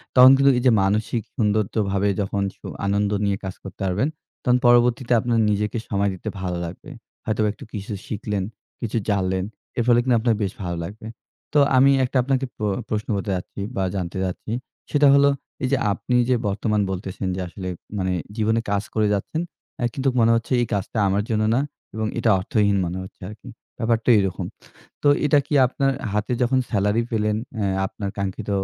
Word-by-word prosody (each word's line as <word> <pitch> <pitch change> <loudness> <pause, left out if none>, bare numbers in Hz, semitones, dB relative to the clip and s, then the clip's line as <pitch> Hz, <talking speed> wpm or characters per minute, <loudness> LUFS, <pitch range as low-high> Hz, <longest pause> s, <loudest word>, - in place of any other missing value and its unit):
তখন 130 +1 +10
কিন্তু 140 0 +5
এইযে 125 0 +4
মানসিক 110 +3 0
সৌন্দর্যভাবে 105 -2 +1
যখন 100 0 -1 0.2
সু - - -10 0.2
আনন্দ 100 +1 +1
নিয়ে 100 -1 +1
কাজ 95 - -4
করতে 95 +1 -10
পারবেন, 100 +10 +1 0.4
তখন 125 -1 +4
পরবর্তীতে 120 +1 +4
আপনার 115 0 +1
নিজেকে 105 +2 0
সময় 100 -1 +1
দিতে 90 - -5
ভালো 90 -2 -2
লাগবে। 90 +12 -9 0.4
হয়তোবা 110 -1 +1
একটু - - -13
কিছু 105 0 -5
শিখলেন, 105 -2 -2 0.4
কিছু 115 0 -2
জানলেন। 95 -1 +1 0.3
এর 120 - +2
ফলে 120 0 +6
কিন্তু 125 -2 +3
আপনার 115 -1 +2
বেশ 95 - -1
ভালো 85 -1 -3
লাগবে। 105 +5 -8 0.5
তো 150 - +5 0.2
আমি 135 +2 +6
একটা 130 - -1
আপনাকে 135 0 0
প্র 110 - -6 0.3
প্রশ্ন 105 -1 -2
করতে 100 0 -2
যাচ্ছি 90 +2 -6
বা, 95 - 0
জানতে 90 0 -3
চাচ্ছি। 95 +4 -4 0.4
সেটা 145 -1 +5
হলো, 140 0 +6 0.3
এইযে 130 +1 +2 0.2
আপনি 125 +6 -2
যে 125 - +4
বর্তমান 105 +1 0
বলতেছেন 95 0 -4
যে, - - -4
"আসলে 90 +1 -7 0.3
মানে 95 -1 0 0.2
জীবনে 110 +1 +2
কাজ 100 0 +1
করে 110 -1 +2
যাচ্ছেন। 155 - -2 0.4
এ্যা 120 - +1
কিন্তু 135 0 +1
মনে 115 0 +5
হচ্ছে 115 +3 -3
এই - - +2
কাজটা 100 +3 -2
আমার 100 +2 +1
জন্য 110 -1 +1
না।" 135 - +3 0.3
এবং 110 0 -1
এটা 115 - +2
অর্থহীন 100 +1 +2
মনে 85 +2 -3
হচ্ছে 95 - -13
আরকি। 110 +4 -11 0.3
ব্যাপারটা 115 0 +1
এইরকম। 95 -2 0 0.6
তো 145 - +4 0.2
এটা 145 0 +5
কি - - -5
আপনার 135 +1 0 0.2
হাতে 105 +3 -1
যখন 130 +2 +2
স্যালারি 105 +2 +1
পেলেন 105 -1 +1 0.2
এ্যা 100 - +1 0.2
আপনার 100 0 -5
কাঙ্ক্ষিত 100 +2 -3
105 Hz, 180 wpm, -23 LUFS, 100-120 Hz, 0.6 s, তখন